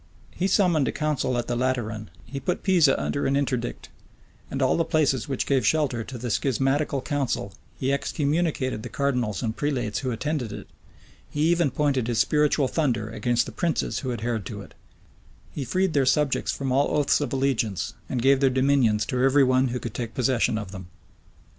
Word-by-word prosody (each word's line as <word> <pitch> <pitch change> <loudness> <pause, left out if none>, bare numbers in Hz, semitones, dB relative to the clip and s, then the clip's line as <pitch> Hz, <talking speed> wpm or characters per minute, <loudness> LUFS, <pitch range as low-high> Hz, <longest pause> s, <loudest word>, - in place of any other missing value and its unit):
He 185 - -1
summoned, 175 -7 +3
a - - 0
council 150 -5 -1
at 120 - -1
the 120 - -2
Lateran: 120 -4 -2 0.2
he 135 - -6
put 175 +7 -2
Pisa 175 -8 +4
under 140 - -1
an 135 - +1
interdict, 130 -4 -2 0.6
and 135 - -4
all 130 -2 +3
the 165 - +2
places 145 -7 +1
which 135 - -1
gave 135 -3 +2
shelter 130 -2 +1
to 130 +2 -8
the 120 0 -4
schismatical 135 +2 0
council: 135 -9 -2 0.3
he 135 +1 +1
excommunicated 145 -4 -1
the - - -7
cardinals 125 -9 -1
and 110 -1 -2
prelates 130 -7 -1
who 130 - -3
attended 125 -1 -2
it: 105 - -7 0.6
he 150 - -3
even 170 -1 +3
pointed 135 -4 0
his 120 -2 -1
spiritual 150 +2 +2
thunder 120 -8 -1
against 120 +2 0
the - - -7
princes 170 -2 -1
who 130 -3 -3
adhered 115 -2 -2
to 105 -3 -7
it: - - -16 0.8
he 145 - -4
freed 185 +7 0
their 135 -3 +2
subjects 150 -1 +2
from 135 -2 -3
all 140 +3 +2
oaths 145 0 +2
of 140 -4 -2
allegiance, 130 -7 -1 0.2
and 125 -2 -2
gave 135 0 +5
their 135 -1 +4
dominions 130 -5 +2
to 125 -2 -1
every 135 +2 +5
one 130 0 +3
who 125 0 -3
could 115 -3 -6
take 115 -2 -5
possession 125 -3 +1
of 105 -4 -6
them. 95 -3 -8
130 Hz, 190 wpm, -25 LUFS, 120-145 Hz, 0.8 s, gave